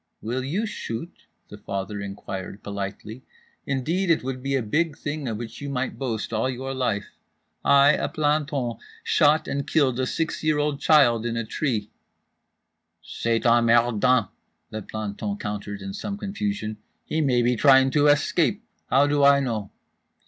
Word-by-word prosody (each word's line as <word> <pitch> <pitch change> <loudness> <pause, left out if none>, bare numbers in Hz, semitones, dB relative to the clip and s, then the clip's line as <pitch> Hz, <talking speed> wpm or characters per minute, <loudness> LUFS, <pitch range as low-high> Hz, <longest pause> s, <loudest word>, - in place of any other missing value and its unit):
"Will 125 +4 -3
you 180 - -1
shoot?" 165 - -6 0.2
the - - -11
father 100 +1 -4
inquired 100 0 -7
politely. 100 +3 -6 0.5
"Indeed 165 +8 -1
it 165 - +3
would 130 0 -4
be 135 +1 -1
a 130 - 0
big 155 +7 0
thing 145 -2 -4
of 110 -3 -2
which 120 +2 -8
you 140 - -4
might 130 -1 -3
boast 115 -5 -3
all 110 +4 +1
your 130 +1 -4
life: 125 -6 -1 0.5
I, 140 0 +6
a - - -1
planton, 145 -5 0 0.3
shot 155 0 +3
and 140 0 -3
killed 130 -5 +2
a 130 - 0
six 165 +4 -2
year 155 -1 +2
old 145 -1 0
child 120 -8 +4
in 115 0 -2
a 115 - -2
tree."—"C'est 120 -2 -2 1.5
emmerdant," 120 -1 +4 0.4
the 110 - -4
planton 105 -1 -4
countered, 105 -1 -5
in 95 0 -6
some 200 - -5
confusion—"he 195 - -4
may 125 -5 +2
be 120 +1 +2
trying 135 +1 +5
to 150 +1 +3
escape. 165 +8 +2 0.3
How 135 +2 +5
do 145 0 +2
I 140 0 +7
know?" 110 -7 -2
130 Hz, 155 wpm, -24 LUFS, 110-145 Hz, 1.5 s, I